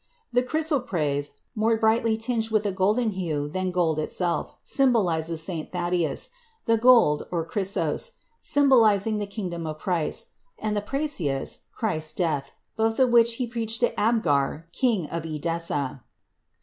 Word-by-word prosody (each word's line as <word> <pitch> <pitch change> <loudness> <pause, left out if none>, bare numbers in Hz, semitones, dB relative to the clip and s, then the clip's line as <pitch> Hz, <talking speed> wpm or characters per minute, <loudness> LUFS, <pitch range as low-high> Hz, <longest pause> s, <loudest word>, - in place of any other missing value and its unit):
The 245 - +4
chrysoprase, 245 - 0 0.2
more 225 0 +2
brightly 220 0 +2
tinged 225 -1 -1
with 215 -1 +1
a 200 - +1
golden 210 +5 +1
hue 160 -7 -2
than 185 +4 -2
gold 170 -4 +1
itself, 170 +2 -1
symbolizes 170 - +1
St. 165 -3 -4
Thaddæus; 175 -4 -1 0.4
the 230 - +4
gold 235 -11 +5
(chrysos) 180 - -1 0.3
symbolizing 225 -7 +4
the 205 - -3
kingdom 180 -5 -5
of 155 0 -5
Christ, 170 -1 -1 0.3
and 215 -1 -2
the 205 - 0
prassius, 210 - -2
Christ's 155 -9 -1
death, 150 -6 -1 0.3
both 225 0 +1
of 255 -2 +3
which 235 -1 +5
he 250 - -1
preached 230 -1 -2
to 240 - +2
Abgar, 160 -10 +1
King 225 - +1
of 165 +2 -4
Edessa. 155 -4 -3
195 Hz, 135 wpm, -25 LUFS, 160-230 Hz, 0.4 s, gold